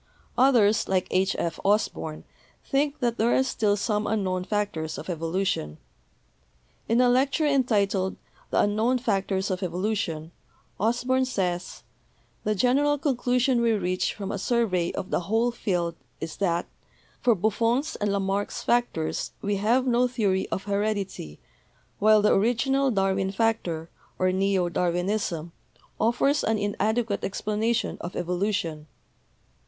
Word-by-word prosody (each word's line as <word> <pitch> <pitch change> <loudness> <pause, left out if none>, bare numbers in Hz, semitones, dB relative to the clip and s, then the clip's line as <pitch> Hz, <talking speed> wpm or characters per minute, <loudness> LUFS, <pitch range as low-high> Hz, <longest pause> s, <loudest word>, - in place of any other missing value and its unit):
Others, 235 -5 +4
like 185 -1 +1
H. 190 +1 +2
F. 170 - -2
Osborn, 195 -6 0 0.4
think 285 +1 0
that 235 -1 0
there 230 +2 +3
are 260 - +4
still 210 -5 +1
some 210 0 -1
unknown 190 -4 -1
factors 185 -6 -2
of - - -5
evolution. 165 - -2 1.1
In 230 +2 +3
a 250 - +5
lecture 270 +5 +2
entitled 205 -9 +1 0.3
'The - - +2
Unknown 220 +5 +2
Factors 195 -4 -1
of 185 0 -2
Evolution' 180 -3 -2 0.5
Osborn 245 +4 +1
says: 180 -8 -3 0.6
"The 215 0 0
general 280 +8 +3
conclusion 250 -3 +1
we 230 -1 +3
reach 185 -3 -1
from 200 -1 -5
a 200 - -3
survey 195 -6 +1
of 185 - -5
the - - +2
whole 225 +7 +1
field 180 -7 -1 0.3
is, 160 0 -5
that 175 -3 0 0.5
for 240 -2 +3
Buffon's 230 - 0
and 205 -1 0
Lamarck's 200 0 -1
factors 240 -10 0
we 205 0 0
have 235 +6 +2
no 250 0 +3
theory 205 -6 0
of 190 - -3
heredity, 200 - -2 0.6
while 215 0 +5
the 210 - +5
original 265 +6 +2
Darwin 195 -3 +1
factor, 195 -7 -1 0.3
or 185 0 +2
neo 190 -1 +1
Darwinism, 175 -1 -1 0.5
offers 260 +6 +2
an 225 - +1
inadequate 210 +1 -1
explanation 215 +3 -1
of 175 - -6
evolution. 175 -3 -2
205 Hz, 130 wpm, -26 LUFS, 185-235 Hz, 1.1 s, a